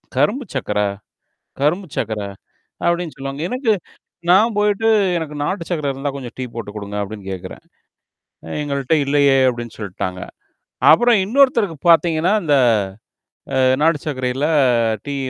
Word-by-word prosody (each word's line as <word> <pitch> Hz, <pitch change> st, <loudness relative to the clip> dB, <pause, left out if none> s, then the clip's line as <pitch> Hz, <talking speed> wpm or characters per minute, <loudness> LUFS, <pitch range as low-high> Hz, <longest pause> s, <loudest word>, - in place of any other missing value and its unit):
கரும்பு 255 Hz, +5 st, +1 dB
சக்கர 105 Hz, -6 st, -2 dB, 0.8 s
கரும்பு 175 Hz, +7 st, +1 dB
சக்கர. 110 Hz, -1 st, -2 dB, 0.6 s
அப்பிடின்னு 170 Hz, -2 st, 0 dB
சொல்லுவாங்க. 135 Hz, +1 st, -5 dB
எனக்கு 250 Hz, -1 st, +1 dB, 0.6 s
நான் 215 Hz, +5 st, +5 dB
போயிட்டு 210 Hz, +1 st, +2 dB, 0.3 s
எனக்கு 160 Hz, -3 st, -4 dB
நாட்டு 180 Hz, +2 st, -2 dB
சர்க்கர 150 Hz, -5 st, -1 dB
இருந்தா 135 Hz, +1 st, -4 dB
கொஞ்சம் 130 Hz, -4 st, -7 dB
டீ 130 Hz, -, -2 dB
போட்டு 115 Hz, -3 st, -6 dB
குடுங்க 105 Hz, -1 st, -6 dB
அப்பிடின்னு 100 Hz, -1 st, -6 dB
கேக்குறேன். 95 Hz, 0 st, -8 dB, 1.0 s
எங்கள்ட்ட 140 Hz, 0 st, 0 dB
இல்லையே! 140 Hz, -1 st, +3 dB
அப்பிடின்னு 120 Hz, -2 st, -3 dB
சொல்ட்டாங்க. 95 Hz, -3 st, -5 dB, 0.7 s
அப்புறம் 240 Hz, +6 st, +5 dB
இன்னொருத்தருக்கு 230 Hz, -, +2 dB
பார்த்தீங்கன்னா, 170 Hz, +1 st, +4 dB
இந்த 150 Hz, -4 st, +2 dB, 1.0 s
அ -, -, +3 dB, 0.2 s
நாடு 160 Hz, 0 st, +3 dB
சர்க்கரையில 130 Hz, -1 st, -2 dB, 0.6 s
டீ 140 Hz, -1 st, -4 dB
145 Hz, 120 wpm, -19 LUFS, 125-180 Hz, 1.0 s, நான்